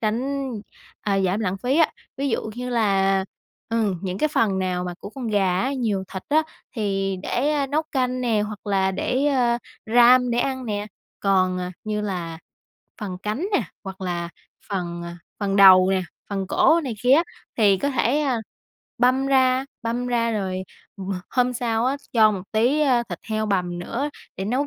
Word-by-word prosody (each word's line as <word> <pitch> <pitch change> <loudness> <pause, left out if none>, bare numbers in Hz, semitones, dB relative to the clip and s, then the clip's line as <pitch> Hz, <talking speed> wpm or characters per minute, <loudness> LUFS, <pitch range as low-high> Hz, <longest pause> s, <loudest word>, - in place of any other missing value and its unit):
tránh, 265 +5 -1 0.5
à, 195 -2 +1
giảm 190 +2 +1
lãng 195 -3 -1
phí 250 +7 0
á. 325 - +5 0.3
Ví 275 +1 -1
dụ 225 -2 -2
như 250 0 -4
là, 195 -4 +2 0.4
ừm, 220 -5 0
những 185 -1 -3
cái 305 - +2
phần 210 -9 +1
nào 180 -1 -1
mà 180 -1 -4
của 200 - -8
con 250 -1 -5
gà 190 -3 +2
á, 265 +5 0
nhiều 220 -8 -1
thịt 190 - -5
á, 310 +2 +4 0.3
thì 195 -3 -1
để 290 +9 0 0.2
nấu 305 +2 +1
canh 255 -1 0
nè, 230 -4 +1
hoặc 210 0 -5
là 195 -1 +2
để, 255 +8 0
ờ, 245 -4 +2 0.3
ram 245 +2 +6
để 235 - 0
ăn 260 0 -1
nè. 205 -1 -2 0.3
Còn, 185 -2 +2
à, 180 0 -4
như 215 -1 -2
là 175 -5 -4 0.6
phần 190 -4 -5
cánh 220 - -2
nè, 330 - +3 0.2
hoặc 190 0 -7
là 175 -2 -2 0.4
phần, 175 -3 -3
à, 170 0 -8 0.2
phần 200 -1 0
đầu 190 -2 +8
nè, 190 -1 +1 0.3
phần 195 -1 -2
cổ 320 - +4
này 250 -4 -3
kia 250 +1 +4
á, 320 +5 +6 0.3
thì 205 -4 +5
có 280 - 0
thể, 260 +2 +1
a, 270 -5 +1 0.6
băm 255 +3 +3
ra, 260 -1 +3 0.2
băm 235 +2 -2
ra, 230 -2 +1
rồi 190 -3 -2 0.3
h 195 - -8 0.3
hôm 250 -1 +2
sau 235 -1 0
á, 270 +2 +1 0.2
cho 220 -2 +6
một 190 -3 -4
tí, 245 +7 +3
a, 260 -5 +3
thịt - - -5
heo 215 -1 -1
bằm 180 -4 -1
nữa 255 +11 -3 0.3
để 190 - -3
nấu 255 +8 0
220 Hz, 190 wpm, -23 LUFS, 195-255 Hz, 0.6 s, đầu